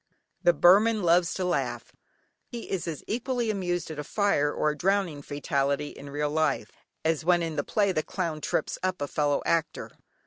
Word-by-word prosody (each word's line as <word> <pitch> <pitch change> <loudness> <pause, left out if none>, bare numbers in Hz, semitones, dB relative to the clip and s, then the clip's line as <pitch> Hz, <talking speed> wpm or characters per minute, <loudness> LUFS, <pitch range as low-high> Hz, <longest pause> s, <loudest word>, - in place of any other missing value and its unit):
The 175 - +5
Burman 210 +4 +5
loves 170 0 +4
to 185 - -2
laugh. 180 - -2 0.6
He 240 -3 -8
is 185 -3 -2
as 160 -3 -5
equally 240 0 -1
amused 175 -4 -2
at 150 - -6
a - - -3
fire 150 -5 +1
or 150 - +1
a - - -6
drowning 180 -2 0
fatality 140 0 -1
in 140 +1 -10
real 145 +1 -2
life, 155 -2 0 0.3
as 160 -1 +1
when 175 0 +3
in 165 -2 -3
the 145 - 0
play 200 -2 +1
the 155 - 0
clown 165 -2 -3
trips - - -1
up 185 0 -1
a 145 - -2
fellow 145 0 0
actor. 165 -2 -1
170 Hz, 185 wpm, -27 LUFS, 150-190 Hz, 0.6 s, The